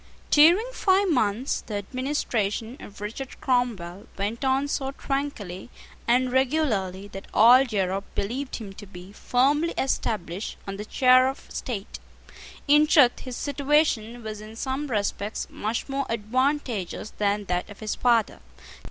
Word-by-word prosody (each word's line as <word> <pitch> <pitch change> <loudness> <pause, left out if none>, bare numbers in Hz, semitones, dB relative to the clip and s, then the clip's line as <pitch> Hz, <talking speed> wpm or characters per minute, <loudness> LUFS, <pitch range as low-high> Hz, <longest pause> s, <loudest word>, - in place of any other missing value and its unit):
During 335 +9 +6
five 385 -4 +2
months, 240 -1 0
the 215 - -4
administration 230 -1 -2
of 205 0 -12
Richard 230 +5 -6
Cromwell 215 -8 -1
went 210 +6 -3
on 270 +1 +2
so 270 -2 -2
tranquilly 260 -10 -4 0.4
and 250 +1 +3
regularly 245 -9 0
that 195 0 -9
all 240 +4 +8
Europe 195 -6 -1
believed 255 +7 -3
him 205 -4 -7
to 205 +1 -11
be 180 0 -11
firmly 285 +10 +1
established 205 -7 -2
on 195 0 -5
the 210 - -6
chair 255 +2 +5
of 270 - -8
state. 215 -5 -5 0.7
In 295 +1 +6
truth 275 -6 +5
his 255 -2 -7
situation 280 -5 0
was 215 -1 -6
in 215 +1 -10
some 265 +4 -3
respects 210 -2 -2
much 220 +2 -3
more 275 0 -2
advantageous 235 - -1
than 205 0 +1
that 180 -1 -2
of 205 - -12
his 215 -1 -3
father. 235 -3 +2
235 Hz, 140 wpm, -25 LUFS, 205-270 Hz, 0.7 s, all